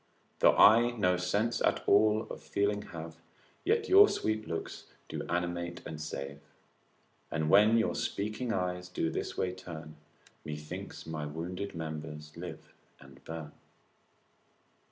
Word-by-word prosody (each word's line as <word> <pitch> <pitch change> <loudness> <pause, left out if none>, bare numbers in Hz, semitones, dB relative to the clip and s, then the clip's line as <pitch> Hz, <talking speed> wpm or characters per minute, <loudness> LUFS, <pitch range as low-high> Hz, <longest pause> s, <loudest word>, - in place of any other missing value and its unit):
Though - - +6
I 115 +3 +8
no 90 -3 +3
sense 100 +6 0
at - - +2
all 105 +1 +4
of - - -7
feeling 100 +1 0
have. 80 -1 -8 0.5
Yet 440 +4 +2
your 405 +2 +8
sweet 110 0 -1
looks 85 - -5 0.2
do - - -4
animate 85 0 -2
and 80 -1 -6
save; 70 -2 -5 0.9
And 80 -1 -1
when 105 +3 +7
your 115 - +2
speaking 105 +4 -2
eyes 90 -2 -2
do 80 -2 -1
this - - -4
way 90 -1 0
turn, 80 -4 -9 0.5
Methinks 75 0 -7
my 75 -2 -4
wounded 90 +6 -5
members 75 -1 -6
live - - -8 0.3
and 70 0 -16
burn. 80 -2 -6
90 Hz, 135 wpm, -31 LUFS, 80-105 Hz, 0.9 s, I